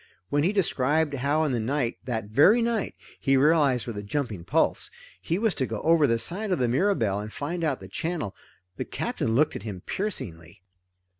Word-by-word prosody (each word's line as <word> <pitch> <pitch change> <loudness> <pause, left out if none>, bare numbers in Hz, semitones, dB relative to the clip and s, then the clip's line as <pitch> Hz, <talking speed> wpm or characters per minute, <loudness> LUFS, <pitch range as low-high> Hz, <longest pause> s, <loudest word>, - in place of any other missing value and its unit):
When 145 - +2
he 175 +6 +2
described 155 -5 +1
how 140 +4 +1
in 150 - 0
the 120 - 0
night 120 +1 -1
that 115 -4 -2
very 145 - +5
night, 230 -3 -1 0.2
he 135 0 +3
realized 140 -3 +3
with 115 -4 -5
a - - -4
jumping 105 -4 -3
pulse 85 - +1 0.3
he 165 - -1
was 220 -1 +1
to 130 - -1
go 110 -1 -4
over 160 -2 +5
the 115 - +2
side 195 - -3
of 180 - +2
the 125 -3 +1
Mirabelle 120 - +1
and 105 +1 -6
find 170 +7 -4
out 145 -5 0
the 95 - -10
channel, 160 - -3 0.4
the - - -2
Captain 110 - -2
looked 150 +4 +3
at - - -5
him 100 -4 -6
piercingly. 90 - -5
140 Hz, 200 wpm, -26 LUFS, 110-165 Hz, 0.4 s, very